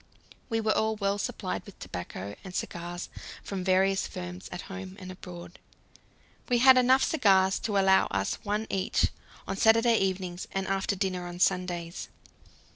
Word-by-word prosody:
We 225 -1 0
were 215 -1 +2
all 220 0 +1
well 200 -1 0
supplied - - -3
with - - -13
tobacco 95 +3 -6
and 185 -2 -9
cigars 175 +1 -4 0.4
from 195 -2 -4
various 190 +1 +2
firms 180 0 -7
at 180 - -5
home 195 -1 -8
and 185 -1 -8
abroad. 180 -1 -10 0.9
We 245 - +4
had 260 +2 +8
enough 255 +1 +5
cigars 195 -9 +3
to 210 -3 -1
allow 190 -1 +5
us 95 0 -1
one 210 +1 -1
each 190 +1 +1 0.4
on 195 - -3
Saturday 230 +2 +5
evenings 185 -2 -2
and 195 0 -1
after 195 +1 0
dinner 185 -2 -2
on 175 0 -7
Sundays. 175 -2 0
190 Hz, 155 wpm, -28 LUFS, 180-210 Hz, 0.9 s, had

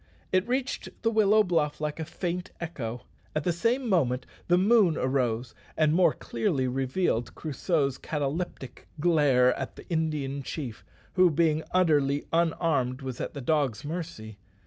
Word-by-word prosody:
It 185 +2 +2
reached 255 +2 -2
the 225 - +3
willow 215 -1 +5
bluff 165 -5 0
like 150 +1 -3
a 160 - -3
faint 175 +2 -4
echo. 125 -8 -5 0.3
At 155 - 0
the 175 - +1
same 235 +9 0
moment 135 - +1 0.2
the 175 - +4
moon 195 -4 +4
arose 125 -3 0 0.2
and 155 -1 +3
more 180 +2 +5
clearly 145 -12 -1
revealed 130 -1 -1
Crusoe's 145 -2 -1
cataleptic 145 -3 -4
glare 145 -6 +4
at - - -5
the - - -13
Indian 150 -4 -1
chief, 130 -4 -6 0.3
who, 185 -1 +5
being 160 0 +2
utterly 145 -6 +2
unarmed, 160 -6 +1
was 130 -2 -5
at - - -5
the 140 - -5
dog's 140 -4 0
mercy. 150 - -6
155 Hz, 145 wpm, -28 LUFS, 135-175 Hz, 0.3 s, willow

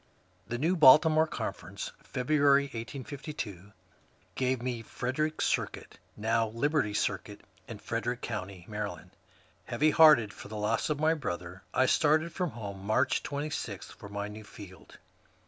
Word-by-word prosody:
The 120 - -3
Baltimore 155 0 +7
Conference, 100 - -5
February, 140 +1 +3
1852, 120 - -7 0.6
gave 130 -1 0
me 120 -1 -3
Fred 125 +4 -4
erick 155 0 0
Circuit, - - -2 0.2
now 115 +1 +1
" - - -8
Liberty 115 -2 0
Circuit," - - -2 0.3
in - - -7
Frederick 120 +1 -3
County, 100 -5 -5
Md. 100 -5 -5 0.5
Heavy 145 +6 +2
hearted 150 -11 +6
for - - -10
the 105 +1 -7
loss 110 +6 0
of 150 -1 -1
my 155 +1 +3
brother, 90 - -5
I 130 - +3
started 155 +4 +3
from 180 -3 -1
home, 100 -6 -7
March 110 +6 +2
26, 140 -8 -4
for 100 - -11
my 100 0 -4
new 105 +1 -9
field. 95 -5 -13
120 Hz, 140 wpm, -30 LUFS, 105-145 Hz, 0.6 s, Baltimore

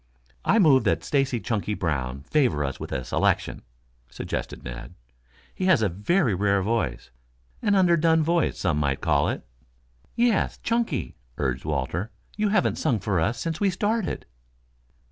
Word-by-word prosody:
"I 200 - +3
move 150 -10 +5
that - - +1
Stacy 135 -4 +1
Chunky 105 -2 -2
Brown 70 -7 -2
favor 85 - +1
us 70 -2 -4
with - - -7
a 65 - -2
selection," - - 0 0.5
suggested - - -5
Ned. - - -8 0.6
"He 185 - -3
has 170 -12 +4
a 100 - +2
very 110 - +1
rare 100 0 +1
voice 95 - -2 0.5
an 205 - +2
underdone 170 -3 +4
voice 170 0 +1
some 75 -2 0
might 70 -2 0
call - - +2
it." - - -4 0.7
"Yes, 235 -3 +2
Chunky," 230 - -1 0.2
urged 65 -2 -2
Walter. 80 - -2 0.3
"You 210 0 +1
haven't 200 -2 +1
sung 135 -8 +1
for 95 -2 0
us 110 +8 0
since 165 -1 -3
we 200 - +4
started." 205 +3 -1
115 Hz, 150 wpm, -25 LUFS, -, 0.7 s, move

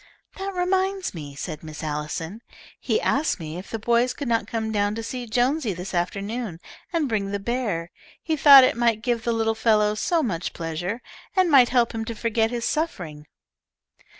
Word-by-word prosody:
"That 390 0 -4
reminds 375 +1 0
me," 145 -5 -8
said 155 +2 -6
Miss 155 0 -8
Allison, 155 +6 -4 0.4
"he 445 - 0
asked 305 - +1
me 160 +1 -6
if 185 - -11
the 225 - -3
boys 235 +3 +1
could 285 - -5
not 230 -1 +1
come 220 -1 -2
down 205 -1 0
to 225 - -4
see 245 +1 -5
Jonesy 245 +1 +1
this 180 +3 -7
afternoon, 200 +2 -3 0.3
and 330 -4 0
bring 210 -4 -1
the 200 - -1
bear. 200 -7 -2 0.3
He 320 - -1
thought 280 -3 +9
it - - +3
would 230 -2 +1
give 240 -2 0
the 235 - 0
little 225 -1 +1
fellow 215 -2 +3
so 325 +9 +1
much 180 -7 -2
pleasure, 175 +7 -4 0.3
and 370 -3 +3
might 260 -4 +7
help 240 -2 +2
him 225 0 -3
to 230 - -5
forget 225 0 +1
his 235 -1 -3
suffering." 165 - -3
225 Hz, 185 wpm, -24 LUFS, 190-255 Hz, 0.4 s, thought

